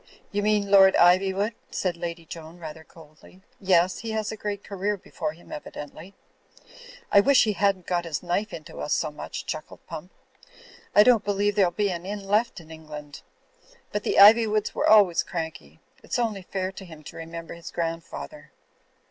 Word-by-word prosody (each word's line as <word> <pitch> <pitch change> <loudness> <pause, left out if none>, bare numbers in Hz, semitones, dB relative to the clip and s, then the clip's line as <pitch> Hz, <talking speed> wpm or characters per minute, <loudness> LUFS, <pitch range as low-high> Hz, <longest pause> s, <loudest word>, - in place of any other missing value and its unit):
"You 205 - -1
mean 205 -1 +1
Lord 195 -1 +7
Ivywood," 190 +4 +3 0.2
said 180 -2 -2
Lady 170 -1 -6
Joan, 165 +1 -10
rather 160 -1 -9
coldly. 160 +3 -18 0.2
"Yes, 185 -1 +2
he 230 - -6
has 215 -1 -2
a - - -5
great 205 -1 -5
career 200 +1 -2
before 160 -4 -5
him, 170 - -18
evi 150 - -8
dently." 155 +6 -9 1.0
"I 200 - +7
wish 275 +6 +5
he 215 - +1
hadn't 195 -3 +1
got 175 -1 -1
his 155 -2 -4
knife 200 +5 -1
into 155 -3 -9
us - - -1
so - - 0
much," 150 - -7
chuckled 155 0 -7
Pump. 165 +2 -8 0.9
"I 210 - +9
don't 235 -2 +5
believe 205 0 +1
there'll 195 -4 +4
be 200 +2 -1
an 175 +1 -5
inn 200 -1 -5
left 210 +1 +1
in 160 -1 -15
England. 150 -2 -10 0.7
But 210 - -2
the - - -1
Ivjrwoods 215 +1 +6
were - - +1
always 200 -6 +6
cranky. 160 - -6 0.2
It's - - -3
only 220 -5 -1
fair 185 0 -3
to 195 - -10
him 160 -4 -12
to - - -11
remember 165 0 -7
his 170 0 -9
grand 165 -1 -3
father." 305 - -10
185 Hz, 180 wpm, -25 LUFS, 165-205 Hz, 1.0 s, I